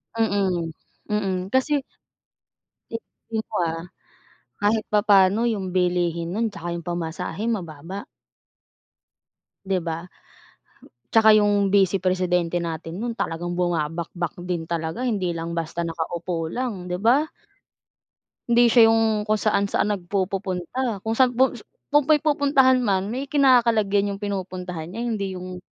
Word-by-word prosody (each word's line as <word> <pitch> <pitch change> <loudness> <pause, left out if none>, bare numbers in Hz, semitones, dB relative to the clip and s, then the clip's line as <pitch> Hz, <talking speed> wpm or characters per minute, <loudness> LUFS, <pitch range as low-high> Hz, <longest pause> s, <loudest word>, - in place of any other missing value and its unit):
Mm, 195 -7 0 0.4
mm. 190 -3 -1
Kasi 280 +2 +2 1.1
tignan 225 -1 -6
mo - - -1
ah, 165 0 -4 0.8
kahit 215 +1 +2
papano 205 -1 +5
yung 190 -5 -3
bilihin 175 -2 0
nun 225 +3 0
tsaka 170 +1 -5
yung 170 -1 -6
pamasahe, 175 +3 -4
mababa. 180 -2 -5 1.6
'Di 190 -1 +1
ba? 165 0 -4 1.1
Tsaka 220 -1 +7
yung 205 -1 +3
bise-presidente 185 -3 +2
natin 165 0 -5
nun 240 0 -2
talagang 175 +1 -2
bumabakbak 170 0 -2 0.2
din 175 -2 -2
talaga. 165 +7 -3
Hindi 195 -8 -1
lang 165 0 -4
basta 170 0 -3
nakaupo 165 0 -3
lang, 215 -3 -4
'di 180 - -1
ba? 260 +7 +4 1.2
Hindi 235 0 +5
siya 230 -2 +7
yung 225 -1 +2
kung 215 - +3
saan-saan 210 -1 +1
nagpupupunta, 195 +3 -2
kung 225 - -2
saan 250 -2 +4
pu 260 +2 +4 0.4
kung 295 0 +5
may 310 - +6
pupuntahan 280 -4 +4
man 195 -3 +1
may 265 +4 -3
kinakalagyan 230 -8 +3
yung - - -11
pinupuntahan 185 -4 -4
niya 225 +5 -5
hindi 200 -5 -2
yung 180 0 -7
195 Hz, 125 wpm, -24 LUFS, 175-225 Hz, 1.6 s, Tsaka